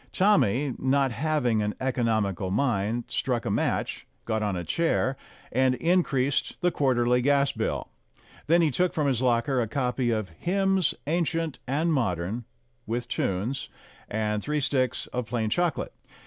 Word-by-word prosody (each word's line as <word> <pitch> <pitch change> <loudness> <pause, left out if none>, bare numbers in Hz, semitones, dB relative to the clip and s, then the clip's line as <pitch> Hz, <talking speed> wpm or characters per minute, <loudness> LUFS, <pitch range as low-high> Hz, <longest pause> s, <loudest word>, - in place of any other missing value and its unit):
Tommy, 145 - +3
not 135 0 +2
having 130 -5 +1
an 105 0 -2
economical 110 -8 0
mind, 115 0 0
struck 125 -3 -1
a - - -1
match, - - -1 0.2
got 110 -1 -1
on 105 -3 0
a 90 - -3
chair, 135 - +1 0.4
and 130 +1 +3
increased 145 -5 +1
the 180 0 +3
quarterly 125 -4 +2
gas 140 +1 +3
bill. - - -2 0.6
Then 170 +2 +5
he 155 - +3
took 180 +6 +1
from 150 - 0
his 130 -4 +1
locker 125 +1 +2
a 115 - -1
copy 125 +1 -1
of 110 -4 -1
"Hymns 195 -1 +1
Ancient 165 -2 -1
and 155 +5 +1
Modern," 105 - -1 0.4
with 120 +2 -2
tunes, 115 +3 -2 0.4
and 105 0 -1
three 150 +4 -1
sticks 130 -3 0
of 125 -2 -2
plain 115 -3 -1
chocolate. 175 +2 0
130 Hz, 150 wpm, -27 LUFS, 115-150 Hz, 0.6 s, Then